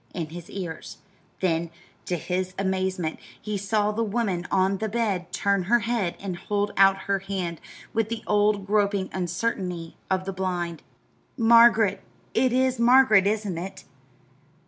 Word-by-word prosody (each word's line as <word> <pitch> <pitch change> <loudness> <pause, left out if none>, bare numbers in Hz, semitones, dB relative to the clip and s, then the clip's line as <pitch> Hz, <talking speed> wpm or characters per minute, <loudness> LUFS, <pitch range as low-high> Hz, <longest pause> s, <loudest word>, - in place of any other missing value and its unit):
in 165 -4 -3
his 175 +1 -9
ears; 175 -5 -6 0.4
then, 170 -2 0 0.4
to 175 - 0
his 185 +3 -3
amazement, 190 -3 -1 0.2
he 210 -1 -4
saw 205 +1 0
the 220 +2 -2
woman 200 -5 -1
on 190 0 +2
the 220 0 -2
bed 200 -5 -1
turn 200 -2 0
her 240 +4 +3
head 225 -6 -1
and 190 -3 -5
hold 205 +2 -1
out 195 0 +5
her 200 -1 +1
hand 190 -4 -4 0.3
with 225 -1 0
the 230 -1 -4
old 205 -1 +2
groping 200 -2 +1
uncertainty 180 -2 -3
of 185 0 0
the 195 - -3
blind. 180 -3 -3 0.6
"Margaret! 230 -3 +5 0.3
It 255 +2 +2
is 255 0 +1
Margaret, 235 -5 +6
isn't 205 -5 -1
it?" 190 +3 -7
195 Hz, 145 wpm, -25 LUFS, 185-215 Hz, 0.6 s, Margaret